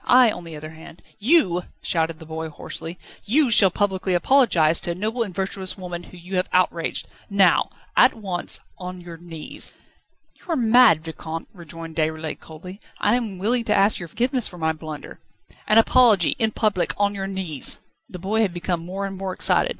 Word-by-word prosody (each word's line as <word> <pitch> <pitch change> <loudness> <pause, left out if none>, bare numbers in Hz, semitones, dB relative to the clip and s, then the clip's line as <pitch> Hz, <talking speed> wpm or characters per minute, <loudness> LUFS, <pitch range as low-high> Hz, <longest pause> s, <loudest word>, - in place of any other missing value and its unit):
I, 250 -2 +6
on 175 - -7
the 165 -1 -8
other 155 +1 -8
hand 160 +1 -14
..." - - -29
"You," 205 - +3 0.2
shouted 165 -1 0
the 160 - -12
boy 160 0 -5
hoarsely, 165 +3 -7 0.3
"you 265 +3 +2
shall 200 -3 +7
publicly 190 -1 0
apologise 175 - +3
to - - -3
a 170 - -1
noble 220 +6 -2
and 215 -4 -1
virtuous 190 -1 -3
woman 175 -2 -6
whom 180 - -14
you 185 +1 -4
have 180 - 0
outraged 175 -2 0 0.2
now 195 -4 +3 0.3
at 255 - +5
once 190 -5 +1 0.2
on 180 0 -7
your 170 -1 -10
knees 165 -2 -2 0.3
..." - - -46
"You - - -23
are - - +1
mad, 230 - +5
Vicomte," 165 0 -7
rejoined 165 -2 -10
Déroulède 160 0 -2
coldly. 180 +5 -11 0.2
"I 210 +3 +3
am 225 -6 -3
willing 230 +6 +1
to 210 - +2
ask 200 +2 +3
your 175 - -7
forgiveness 245 - 0
for 180 - -11
my 160 -1 0
blunder 155 -1 -9 0.3
..." - - -27
"An 215 - +4
apology 225 -6 +5
in 220 - +3
public 210 -4 0
on 205 0 +1
your 195 -1 -4
knees 185 -7 -2
..." - - -49
The 180 - -8
boy 200 +5 0
had 190 -5 0
become 175 -1 -2
more 190 +3 -4
and 195 0 -5
more 190 0 -4
excited. - - +3
185 Hz, 200 wpm, -23 LUFS, 165-210 Hz, 0.3 s, shall